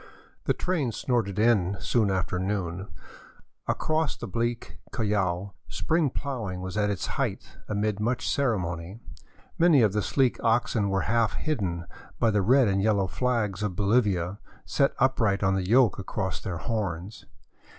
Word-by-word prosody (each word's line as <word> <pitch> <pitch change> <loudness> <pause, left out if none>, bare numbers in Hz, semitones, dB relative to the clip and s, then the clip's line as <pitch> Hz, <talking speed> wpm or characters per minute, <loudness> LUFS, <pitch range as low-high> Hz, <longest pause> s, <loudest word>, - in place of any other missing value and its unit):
The - - +2
train 160 -10 -1
snorted 110 -4 -1
in 105 -4 +3
soon 110 -4 +1
after 95 -1 -1
noon. 95 -1 -2 0.8
Across 155 -2 0
the - - -6
bleak 120 0 -3
Collao 100 -4 -1
spring 150 - +1
plowing 120 -10 -4
was 95 +1 -5
at 105 -1 +1
its 100 -3 -2
height, - - -3
amid 105 0 0
much 120 +3 -1
ceremony. 95 - -1 0.6
Many 165 -7 +6
of 105 -3 +3
the 105 - +1
sleek 130 +3 +1
oxen 115 -3 +2
were 95 -1 +1
half 115 +1 +1
hidden 95 - -2 0.3
by 115 - +3
the 105 -1 +2
red 125 +5 +5
and 95 -1 +1
yellow 100 -2 +2
flags 105 -2 -1
of 105 -4 -2
Bolivia, 100 -3 +1 0.3
set 140 -1 +1
upright 115 -7 +2
on 95 0 +3
the 95 -1 -1
yoke 120 -3 +4
across 95 -2 -3
their 90 -3 -4
horns. 100 -2 -4
105 Hz, 150 wpm, -27 LUFS, 95-120 Hz, 0.8 s, Many